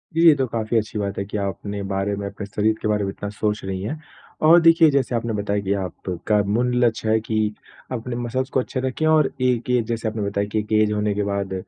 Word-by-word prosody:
जी, 165 - +2
ये 160 - +9
तो 135 -2 0
काफ़ी 115 0 -1
अच्छी 110 -1 -2
बात 100 -1 -3
है - - -1
कि 105 - -4
आप 100 -1 -1
अपने 100 0 -5
बारे 100 +1 -1
में, 100 0 -5
अपने 100 +1 -7
शरीर 105 +2 +1
के - - -1
बारे 105 -1 +1
में 95 - -1
इतना 100 +1 -6
सोच 105 0 -2
रही 95 -1 -3
हैं। 120 +11 -4 0.5
और 170 +2 +8
देखिए 165 -1 +6
जैसे 135 -3 +1
आपने 115 -1 -1
बताया 100 0 -1
कि 100 0 0
आपका 95 +1 -1
मुल 120 +5 0
लक्ष्य 110 -1 0
है 110 0 +4
कि 110 -1 -1 0.4
अपने 120 0 -4
मसल्स 125 +2 -2
को 130 - +1
अच्छे 130 +1 -3
रखें 130 +4 -1
और 155 -3 +4
एक 125 -1 +1
एज 125 -2 +2
जैसे 115 -1 -2
आपने 110 0 -3
बताया 100 0 -1
कि 110 - +1
एक 105 +1 -6
एज 105 -1 +2
होने 105 0 0
के 105 - 0
बाद 100 -1 -2
110 Hz, 250 wpm, -22 LUFS, 100-125 Hz, 0.5 s, ये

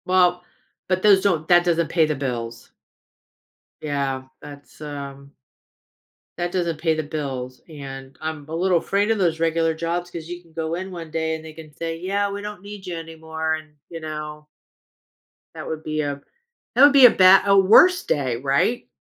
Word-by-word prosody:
Well, 180 -1 +3 0.4
but 185 0 -1
those 200 -2 +6
don't 165 -6 0
that 175 -1 +5
doesn't 170 -2 +1
pay 165 -2 +3
the 155 - -1
bills. 120 -4 -5 1.1
Yeah. 140 -3 -2 0.2
That's, 145 -1 -13
um 140 -1 -8 1.0
That 175 0 -2
doesn't 170 -4 -1
pay 160 0 +1
the 155 - -2
bills, 135 -4 -5
and, 135 -4 -10
I'm 155 -2 -5
a 160 - -5
little 180 +1 +2
afraid 200 +5 0
of 225 - +1
those 170 -4 0
regular 165 0 +1
jobs 170 +2 -3
'cause 170 -2 -8
you 175 0 -7
can 165 -2 -24
go 160 0 -3
in 190 +2 -5
one 165 -3 -8
day 160 0 -1
and 160 - -9
they 160 - -9
can 155 -1 -13
say, 165 +1 -5
"Yeah, 200 +3 -1
we 200 0 -5
don't 210 -2 -7
need 200 -1 -10
you 175 - -4
anymore," 160 -1 -4
and, 155 -1 -12
you 165 - -7
know 150 -1 -7 1.1
that - - -8
would 160 0 -5
be 155 0 -2
a 140 -1 -4 0.5
that 255 - +4
would 285 0 +8
be 275 -3 +9
a - - +7
bad 190 -1 +6
a 200 0 +5
worst 230 - +6
day, 130 -5 0
right? 140 - 0
160 Hz, 185 wpm, -22 LUFS, 150-180 Hz, 1.1 s, be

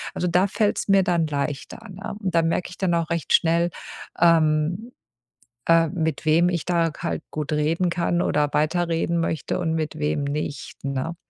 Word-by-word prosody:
Also, 180 - -1
da 180 +3 +3
fällt's 205 +1 0
mir 195 -1 +5
dann 170 -3 +1
leichter, 145 +9 -4
ne? 195 +1 -7
Und 185 -4 -2
dann 165 -1 +3
merke 175 - -1
ich - - -11
dann 185 -3 +1
auch 165 -1 -1
recht 170 -1 -2
schnell, 170 +1 +3 0.5
ähm 165 +5 +2 0.8
äh, 165 0 +5
mit 160 -5 -2
wem 165 +3 +4
ich 170 -3 -2
da 170 -2 +1
halt - - -3
gut 150 0 -4
reden 160 +4 +1
kann 175 0 0
oder 150 -3 +1
weiterreden 165 +2 +1
möchte 160 -2 -2
und 160 -2 -1
mit 155 -1 -3
wem 150 -1 0
nicht, 145 -2 -4
ne? 140 +4 -3
165 Hz, 175 wpm, -23 LUFS, 155-175 Hz, 0.8 s, mir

